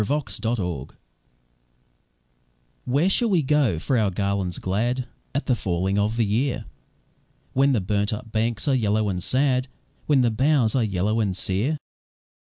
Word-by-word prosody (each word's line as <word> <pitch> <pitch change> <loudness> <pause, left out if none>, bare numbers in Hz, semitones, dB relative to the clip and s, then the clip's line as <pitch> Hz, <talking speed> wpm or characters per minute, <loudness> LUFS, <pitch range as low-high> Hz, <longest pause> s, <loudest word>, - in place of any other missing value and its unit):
A - - 0
Song 145 +2 +1 0.3
of 115 +1 0
Autumn 85 -8 -4 1.9
"Where 140 +8 +2
shall 230 +4 +2
we 180 -6 +2
go 135 - +2
for 120 - 0
our 105 -2 +2
garlands 100 -1 -1
glad 120 +7 -1 0.3
At 140 - -1
the 130 - +2
falling 95 -2 -1
of 105 +3 0
the 115 - +2
year, 120 +3 -1 0.9
When 135 +1 +3
the 115 - +1
burnt 100 +2 0
up 115 +1 -6
banks 110 0 -1
are 140 - +3
yellow 110 -3 +1
and 90 -2 -2
sad, 130 +3 +2 0.4
When 145 -3 +4
the 120 -2 +2
boughs 130 -1 +2
are 130 - +2
yellow 105 +2 0
and 100 -4 0
sere? 110 +14 0
110 Hz, 165 wpm, -24 LUFS, 100-130 Hz, 1.9 s, When